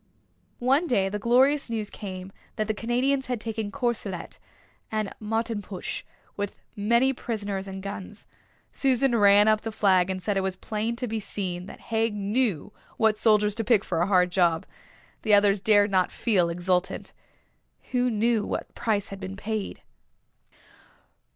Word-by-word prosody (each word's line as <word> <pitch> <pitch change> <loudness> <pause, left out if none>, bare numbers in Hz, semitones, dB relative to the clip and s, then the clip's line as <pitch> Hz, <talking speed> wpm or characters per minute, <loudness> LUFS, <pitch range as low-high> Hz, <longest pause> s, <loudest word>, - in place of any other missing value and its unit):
One 270 +7 +2
day 195 -8 +2
the 210 +1 -3
glorious 260 +6 +3
news 220 -2 -3
came 190 -2 -7 0.2
that 215 - -1
the 215 - 0
Canadians 250 +5 0
had 250 -2 -2
taken 220 -1 -4
Courcelette 225 -9 -3 0.5
and 215 -2 -2
Martenpuich, 215 -3 -3 0.3
with 205 -1 -4 0.2
many 235 +6 +3
prisoners 205 -5 -4
and 190 0 -7
guns. 200 +1 -7 0.5
Susan 265 -2 +2
ran 205 -1 +6
up 215 0 +4
the 225 - -4
flag 190 -4 +3
and 190 0 -2
said 195 +2 -1
it - - +2
was 190 -1 -2
plain 220 +4 -3
to 245 +1 -2
be 225 0 -2
seen 185 -3 -4
that - - -11
Haig 225 -1 +1
knew 205 - -1 0.2
what 220 -1 +3
soldiers 210 -1 +3
to 225 +2 -2
pick 220 -2 +3
for 170 -2 -1
a 175 - +2
hard 180 -2 +3
job. 175 -3 +2 0.6
The 215 -2 +5
others 200 0 +4
dared 205 -1 +4
not 185 -2 +2
feel 190 -8 +1
exultant. 180 +2 -1 0.8
Who 250 0 +2
knew 225 0 +1
what - - -4
price 210 -2 -1
had 195 - -7
been 190 +1 -6
paid? 210 0 -4
210 Hz, 155 wpm, -26 LUFS, 195-230 Hz, 0.8 s, ran